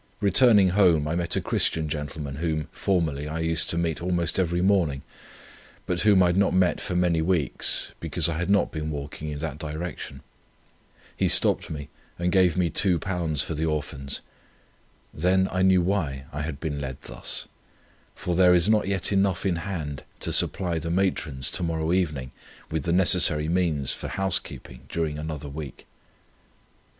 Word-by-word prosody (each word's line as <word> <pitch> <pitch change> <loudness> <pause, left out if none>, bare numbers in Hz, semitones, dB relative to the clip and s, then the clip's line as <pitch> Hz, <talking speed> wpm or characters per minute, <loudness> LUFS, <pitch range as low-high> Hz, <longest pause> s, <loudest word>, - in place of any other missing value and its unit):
Returning 100 -1 +5
home 90 -6 +4
I 80 - -1
met 85 -1 -1
a - - 0
Christian 80 -1 0
gentleman 75 -1 -5
whom 80 -1 -2
formerly 80 -7 -1
I 80 +1 -4
used 80 0 0
to 85 - -2
meet 85 -2 -1
almost 85 -1 -1
every 90 -1 +1
morning, 85 -9 +2 0.8
but 85 -1 -1
whom 100 -3 +5
I 90 - +4
had 85 - 0
not 100 -2 +3
met 90 -2 +2
for 90 - -3
many 90 -2 +2
weeks, 80 -5 0
because - - -1
I 80 -1 -2
had 85 - -2
not 100 0 +3
been 80 -1 -4
walking 75 +1 -6
in 75 - -4
that 75 -1 -5
direction. 80 -3 -6 0.9
He - - +1
stopped - - +3
me 75 -2 -6 0.3
and 90 +1 0
gave 95 -2 +3
me 90 -2 +1
£2 85 -5 0
for - - -4
the 80 +1 -1
Orphans. 70 -3 -3 0.9
Then 95 +3 +2
I 95 - 0
knew 95 -1 +4
why 75 -8 -1
I 75 - -3
had 75 -2 -4
been 75 -3 -3
led 65 -2 -5
thus; - - -4 0.7
for 90 - -3
there 90 0 +6
is 85 +1 +3
not 105 -2 +3
yet 95 -2 0
enough 95 -2 +1
in 90 -3 +1
hand, 85 -6 -4 0.2
to - - -2
supply 90 -4 +2
the 85 +2 -5
matrons 85 -7 0
to - - -4
morrow 80 -1 0
evening 75 -8 -1 0.4
with 80 -3 -2
the 85 - 0
necessary 85 -4 +3
means 80 -5 0
for - - -6
house 95 -1 0
keeping 60 - -11
during 80 -3 -2
another 75 -2 -5
week. 70 0 -8
85 Hz, 175 wpm, -25 LUFS, 75-90 Hz, 0.9 s, there